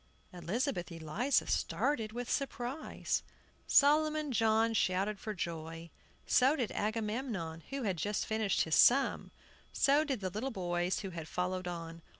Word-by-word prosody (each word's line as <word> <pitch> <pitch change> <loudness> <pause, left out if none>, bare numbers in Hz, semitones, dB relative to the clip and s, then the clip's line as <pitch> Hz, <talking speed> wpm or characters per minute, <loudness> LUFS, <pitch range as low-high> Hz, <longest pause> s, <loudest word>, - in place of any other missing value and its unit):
Elizabeth 180 - -2
Eliza 170 - 0
started 230 -7 0
with 240 +1 -5
surprise. 275 +1 -2 0.5
Solomon 305 0 +4
John 225 0 +3
shouted 195 0 0
with 215 -2 -4
joy; 165 -1 -5 0.3
so 265 +4 +4
did 245 -7 -2
Agamemnon, 210 -6 -3
who 275 -1 -3
had 195 -5 -1
just 205 +5 -1
finished 220 -3 0
his 160 - -1
sum; 265 - +4 0.4
so 285 +2 +3
did 275 -6 -2
the 185 -1 -2
little 220 +8 -3
boys, 175 -4 -1
who 195 -2 -5
had 165 -2 -6
followed 180 +1 -2
on. 165 -1 -6
215 Hz, 140 wpm, -33 LUFS, 175-260 Hz, 0.5 s, Solomon